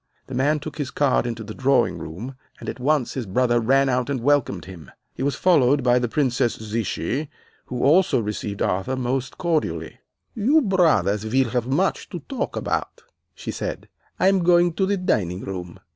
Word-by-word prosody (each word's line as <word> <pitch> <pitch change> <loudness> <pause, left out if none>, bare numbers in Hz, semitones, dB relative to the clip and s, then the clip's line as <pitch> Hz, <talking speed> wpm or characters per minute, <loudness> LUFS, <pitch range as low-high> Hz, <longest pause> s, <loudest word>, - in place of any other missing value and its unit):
The 130 - -9
man 145 +4 +2
took 155 +1 -8
his 140 -2 -2
card 140 -4 +1
into 115 -1 -4
the 110 0 -7
drawing 135 +3 +2
room, 100 +12 -7 0.3
and - - -9
at - - -5
once 145 0 +1
his 125 -5 -4
brother 120 +4 +2
ran 135 +4 +3
out 125 0 0
and 140 -2 -1
welcomed 120 - +1
him. 90 -4 -11 0.2
He - - -8
was 140 +1 0
followed 145 -6 +3
by 125 0 +4
the 120 - 0
Princess 130 -3 +1
Zichy, 110 - -3 0.4
who 125 -1 -3
also 165 0 +4
received 105 -2 -3
Arthur 95 +8 -1
most 130 0 -2
cordially. 165 -3 -2 0.3
"'You 270 +8 +3
brothers 160 - +2
will 125 +3 +1
have 125 -1 -1
much 175 +9 0
to 175 -5 -6
talk 265 - -4
about,' - - -3 0.3
she - - -5
said. - - -5 0.3
'I 185 - +4
am 190 -2 +3
going 175 0 +4
to 190 +3 0
the 200 0 +1
dining 95 - 0
room. 90 -3 -6
130 Hz, 185 wpm, -23 LUFS, 115-155 Hz, 0.4 s, by